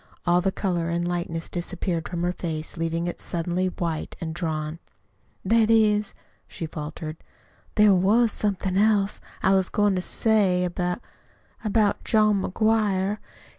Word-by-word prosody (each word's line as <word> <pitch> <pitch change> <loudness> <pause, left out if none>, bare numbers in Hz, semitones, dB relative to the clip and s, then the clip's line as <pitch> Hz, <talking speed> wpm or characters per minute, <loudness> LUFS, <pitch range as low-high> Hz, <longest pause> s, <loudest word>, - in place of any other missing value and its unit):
All 175 0 +4
the 195 +1 +1
color 175 -4 -1
and 170 +1 -1
lightness 170 -2 -3
disappeared 175 -1 -3
from 175 -1 -3
her 175 - +1
face, 160 -3 -5
leaving 165 0 -1
it 175 - -4
suddenly 175 +2 -1
white 170 -3 -3
and 160 -1 -4
drawn. 160 -2 -3 0.7
"That 225 +2 +4
is," 210 -2 +3 0.3
she 170 - -6
faltered, 155 0 -6 0.6
"there 210 -2 +6
was 210 +5 +4
somethin' 195 -2 -1
else 205 -1 +2 0.2
I 190 - +4
was 190 -1 +2
goin' 205 -1 +2
to 185 - 0
say, 195 -3 +2
about 180 +4 -2 0.6
about 215 -1 +1
John 215 -3 +3
McGuire. 210 -1 +1
185 Hz, 140 wpm, -25 LUFS, 170-210 Hz, 0.7 s, there